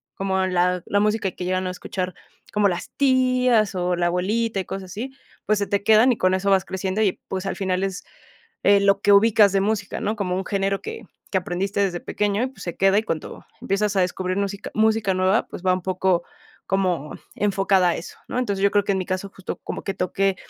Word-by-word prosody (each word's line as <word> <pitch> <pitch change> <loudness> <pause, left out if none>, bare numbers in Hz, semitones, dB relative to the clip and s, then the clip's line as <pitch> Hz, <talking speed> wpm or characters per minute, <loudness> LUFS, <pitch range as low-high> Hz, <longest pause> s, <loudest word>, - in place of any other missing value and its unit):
como 190 -1 0
la 180 0 +1
la 205 - +1
música 210 -2 +1
que 180 - -7
llegan 185 0 -1
a - - -2
escuchar 185 0 -4 0.4
como 210 -1 +3
las 175 -2 -3
tías 255 -5 +3
o 180 0 0
la 175 0 0
abuelita 205 +4 0
y 185 - -3
cosas 190 -2 -6
así, 240 +7 -5 0.3
pues 215 -1 +2
se 200 - -1
te 200 0 0
quedan 220 +4 +6
y 235 - 0
con 185 0 +2
eso 200 +1 -1
vas 190 0 +3
creciendo 190 +2 -2
y 195 -4 +1
pues 190 0 -4
al - - -2
final 190 -1 -1
es 195 -1 -3 0.6
lo 200 0 +4
que 205 - +4
ubicas 210 -1 +6
de 195 - +3
música, 205 -1 -2
¿no?, 215 +2 -1
como 185 -3 -2
un 190 -1 -3
género 195 0 -1
que 450 0 -7 0.3
que 190 - +2
aprendiste 190 +3 -2
desde 180 -3 0
pequeño 210 +2 -1
y - - 0
pues 260 - -12
se 175 - -5
queda 195 +1 +3
y 215 - +2
cuando 165 -7 -5 0.2
empiezas 200 +1 0
a 190 - +3
descubrir 185 +1 -1
música 200 0 -3
música 220 -2 +2
nueva, 185 +4 +2
pues, 180 - -9
va 185 - +4
un 185 - -2
poco 185 -1 +1 0.4
como 180 -6 0 0.2
enfocada 195 -2 +2
a - - 0
eso, - - -8
¿no?, - - -4
entonces 200 -6 -1
yo 200 - +5
creo 205 -1 +3
que 200 - 0
en - - 0
mi 185 - -2
caso 185 +1 -3
justo 190 - -6
como - - -5
que 195 - -2
toqué 190 +1 0
195 Hz, 225 wpm, -23 LUFS, 185-205 Hz, 0.6 s, quedan